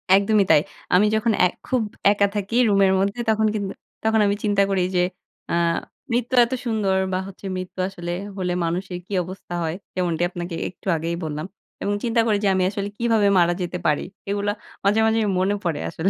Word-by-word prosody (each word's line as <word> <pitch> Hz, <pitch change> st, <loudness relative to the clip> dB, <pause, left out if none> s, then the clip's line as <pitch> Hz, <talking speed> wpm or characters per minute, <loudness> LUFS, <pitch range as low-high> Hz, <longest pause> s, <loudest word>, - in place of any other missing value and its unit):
একদমই 200 Hz, +1 st, +4 dB
তাই। 150 Hz, -, +6 dB, 0.3 s
আমি 195 Hz, +4 st, +6 dB
যখন 220 Hz, +1 st, +2 dB
এ -, -, +7 dB, 0.2 s
খুব 255 Hz, -2 st, +1 dB, 0.3 s
একা 200 Hz, 0 st, +3 dB
থাকি 205 Hz, +3 st, -2 dB
রুমের 195 Hz, -1 st, +4 dB
মধ্যে, 200 Hz, +4 st, 0 dB
তখন 220 Hz, 0 st, +3 dB
কিন্তু 200 Hz, -2 st, -2 dB, 0.3 s
তখন 220 Hz, 0 st, +3 dB
আমি 200 Hz, -, +2 dB
চিন্তা 205 Hz, -1 st, +2 dB
করি 190 Hz, -2 st, +1 dB
যে 180 Hz, -, +4 dB, 0.5 s
আ -, -, +2 dB, 0.6 s
মৃত্যু 245 Hz, +2 st, 0 dB
এত 250 Hz, -, -5 dB
সুন্দর 210 Hz, -4 st, +1 dB, 0.2 s
বা 185 Hz, -, +1 dB
হচ্ছে 195 Hz, +1 st, -11 dB
মৃত্যু 185 Hz, 0 st, -7 dB
আসলে 175 Hz, -3 st, -6 dB, 0.3 s
হলে 180 Hz, -1 st, -1 dB
মানুষের 180 Hz, +2 st, -3 dB
কি -, -, -18 dB
অবস্থা 185 Hz, 0 st, -9 dB
হয়। 160 Hz, +1 st, -2 dB, 0.2 s
যেমনটি 175 Hz, -2 st, 0 dB
আপনাকে 175 Hz, -1 st, -5 dB
একটু 185 Hz, -, -15 dB
আগেই 165 Hz, +2 st, -2 dB
বললাম। 155 Hz, +1 st, -3 dB, 0.4 s
এবং 205 Hz, -, 0 dB
চিন্তা 230 Hz, -1 st, +2 dB
করি 210 Hz, -2 st, +3 dB
যে -, -, +3 dB
আমি 185 Hz, -1 st, +2 dB
আসলে 200 Hz, 0 st, -3 dB
কিভাবে 225 Hz, -3 st, +3 dB
মারা 175 Hz, 0 st, +4 dB
যেতে 180 Hz, 0 st, -3 dB
পারি। 150 Hz, -, +2 dB, 0.3 s
এগুলো 205 Hz, 0 st, 0 dB, 0.3 s
মাঝে, 205 Hz, +3 st, +3 dB
মাঝে 220 Hz, 0 st, +3 dB, 0.2 s
মনে 190 Hz, +2 st, +2 dB
পড়ে 165 Hz, -4 st, -1 dB
আসলে। 180 Hz, +4 st, 0 dB
195 Hz, 190 wpm, -23 LUFS, 180-210 Hz, 0.6 s, এ